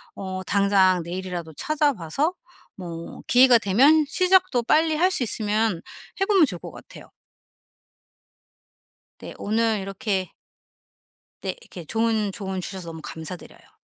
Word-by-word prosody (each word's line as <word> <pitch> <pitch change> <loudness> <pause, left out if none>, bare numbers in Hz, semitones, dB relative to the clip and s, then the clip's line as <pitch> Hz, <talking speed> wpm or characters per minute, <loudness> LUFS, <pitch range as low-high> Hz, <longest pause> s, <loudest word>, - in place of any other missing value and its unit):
어 185 -1 -5
당장 190 -2 +3
내일이라도 175 -2 -6
찾아 300 - +1
봐서 250 - -1 0.4
뭐 170 -3 -8
기회가 250 -1 +6
되면 275 +10 +4
시작도 365 -6 +3
빨리 315 +5 +3
할 365 +4 +3
수 365 - -2
있으면 215 -4 -1 0.4
해 - - +4
보면 390 -6 +5
좋을 180 - -4
것 - - -9
같아요. - - -14 2.1
네 - - -9
오늘 220 0 0
이렇게 195 -1 -3 1.1
네. - - -3
이렇게 175 - -11
좋은 220 0 0
조언 190 -2 -5
주셔서 185 -2 -6
너무 160 -1 -8
감사드려요. 165 +2 -10
205 Hz, 265 characters per minute, -24 LUFS, 185-265 Hz, 2.1 s, 기회가